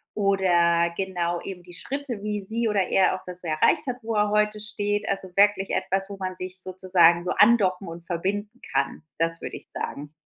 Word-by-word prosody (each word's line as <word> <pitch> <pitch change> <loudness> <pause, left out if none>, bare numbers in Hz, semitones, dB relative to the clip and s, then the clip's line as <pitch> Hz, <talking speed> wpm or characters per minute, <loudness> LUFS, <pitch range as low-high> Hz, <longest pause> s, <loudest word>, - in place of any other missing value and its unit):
oder 175 -4 +3
genau, 175 -3 -2
eben 180 -2 -8
die 175 0 -13
Schritte, 265 +1 -4
wie 210 -1 -2
sie 225 +4 -1
oder 200 -4 +1
er 190 -1 +3
auch 185 - -9
das 180 0 -5
erreicht 170 - +2
hat, 250 - -1
wo 225 0 -3
er 210 0 +2
heute 210 0 +1
steht. 205 -1 -2
Also 195 -1 -2
wirklich 200 -1 +3
etwas, 195 +1 0
wo 200 - -7
man 185 -1 -4
sich 185 0 -3
sozusagen 180 -2 +3
so 180 - 0
andocken 195 -5 +4
und 170 +1 -7
verbinden 205 +7 -3
kann. 135 +2 0 0.2
Das 165 0 0
würde - - -6
ich - - -10
sagen. 145 +1 -5
190 Hz, 195 wpm, -25 LUFS, 175-210 Hz, 0.2 s, andocken